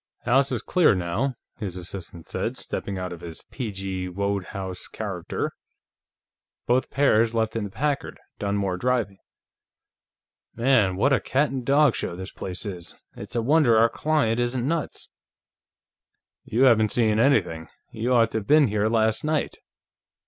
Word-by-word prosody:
"House 135 +3 +3
is 120 -3 -2
clear, 175 - +4
now," 90 +10 -1 0.2
his 95 -5 -5
assistant 85 -2 -7
said, - - -3
stepping 100 -1 -4
out 90 -1 -4
of 85 - -10
his 85 -2 -9
P. 125 -5 -4
G. 95 -1 -4
Wodehouse 95 -1 -3
character. - - -4 1.1
"Both 125 +2 +1
pairs 115 -5 +3
left 110 -1 0
in 110 -2 -1
the - - -6
Packard, 140 +7 -2 0.2
Dunmore 100 -2 -1
driving. 115 -4 -1 1.4
Man, 115 -6 +3
what 135 +9 +3
a 135 - +4
cat 140 +3 0
and 130 -2 -3
dog 140 0 +4
show 85 - -3
this 95 +1 -7
place 90 +2 -6
is! 90 -4 -7 0.2
It's - - -9
a 115 - +1
wonder 135 -3 +4
our 115 +1 +5
client 140 -5 +1
isn't 120 +1 -1
nuts." 165 0 -3 1.3
"You 120 +4 +1
haven't 110 -5 +5
seen 110 -3 +2
anything; 95 - +2 0.2
you 115 +3 -2
ought 115 -2 +4
to 110 - 0
have 100 - -11
been 150 -4 +5
here 105 +1 +1
last 110 -1 +1
night 155 0 0
110 Hz, 155 wpm, -25 LUFS, 95-130 Hz, 1.4 s, our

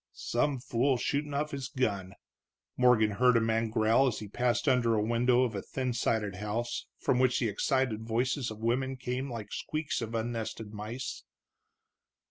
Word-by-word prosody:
"Some 135 +4 0
fool 125 +2 +1
shootin' 145 +3 -1
off 150 +1 -1
his 135 -2 -4
gun," 100 -9 -2 0.6
Morgan 125 -4 +4
heard 125 +3 +4
a - - +5
man 115 0 +1
growl 110 +5 +3
as 120 - -1
he 105 - -6
passed 120 +6 0
under 120 -4 +3
a 105 - +1
window 120 +3 +3
of 120 -3 -1
a 100 - -3
thin 130 +2 -3
sided 105 -4 0
house, 110 +4 -3
from 125 - +1
which 130 -1 +3
the 120 - +1
excited 125 +1 0
voices 125 +3 -1
of 110 - -7
women 130 +3 0
came 125 +2 -3
like 110 -3 -6
the - - -5
squeaks 155 -4 -2
of 115 0 -4
unnested 115 -2 -3
mice. 110 +5 -5
120 Hz, 175 wpm, -30 LUFS, 110-130 Hz, 0.6 s, a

